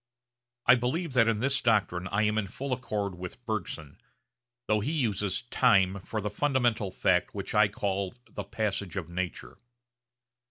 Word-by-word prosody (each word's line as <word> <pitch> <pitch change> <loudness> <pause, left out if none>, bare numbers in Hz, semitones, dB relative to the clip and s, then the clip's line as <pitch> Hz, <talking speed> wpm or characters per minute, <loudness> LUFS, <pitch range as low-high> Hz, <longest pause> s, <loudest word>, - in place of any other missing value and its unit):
I 125 - +8
believe 130 +6 0
that 115 -3 +5
in 110 -2 +1
this 135 +2 +2
doctrine 100 -5 +1
I 100 +2 +1
am 105 +1 +2
in 100 - -2
full 135 +7 -4
accord 105 -6 -2
with 90 +7 -8
Bergson, 90 -9 -4 0.6
though 105 0 +2
he 120 +9 -1
uses 105 - 0
'time' 100 -6 +3
for 110 +4 -4
the 105 0 -3
fundamental 120 -8 +1
fact 90 0 +1
which 100 -1 -4
I 105 0 +6
call 100 0 -2
the 105 - -6
'passage 100 -3 -2
of 85 -3 -4
nature.' 85 -8 -5
105 Hz, 160 wpm, -29 LUFS, 95-120 Hz, 0.6 s, I